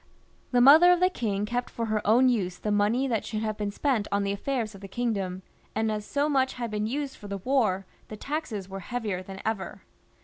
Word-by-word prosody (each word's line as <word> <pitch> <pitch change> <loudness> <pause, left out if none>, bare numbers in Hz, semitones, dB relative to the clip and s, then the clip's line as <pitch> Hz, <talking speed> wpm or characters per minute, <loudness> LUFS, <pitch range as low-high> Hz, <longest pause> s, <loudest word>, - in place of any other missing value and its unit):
The 245 -1 +3
mother 315 +7 +8
of 355 - +4
the 365 +1 +3
king 205 - -1
kept 245 +3 -2
for 230 - -3
her 215 -1 0
own 245 +5 +5
use 190 -8 0
the 210 - -3
money 210 +6 +2
that 230 -4 0
should 215 -1 -3
have 215 -1 -2
be6n 205 -1 -2
spent 245 -4 0
on 200 0 +1
the 200 - -1
affairs 220 +1 -2
of 195 - -12
the 195 - -8
kingdom, 195 -4 -2 0.3
and 220 0 +1
as 210 -1 -3
so 285 +1 +1
much 265 -3 +2
had 235 -3 -4
been 210 0 -1
used 280 +3 -3
for 210 - -11
the 200 0 -4
war, 205 -4 +1 0.2
the 215 - -8
taxes 240 - -4
were 195 0 -6
heavier 210 -2 -3
than 190 +1 -9
ever. 215 -4 -3
220 Hz, 230 wpm, -27 LUFS, 200-255 Hz, 0.3 s, mother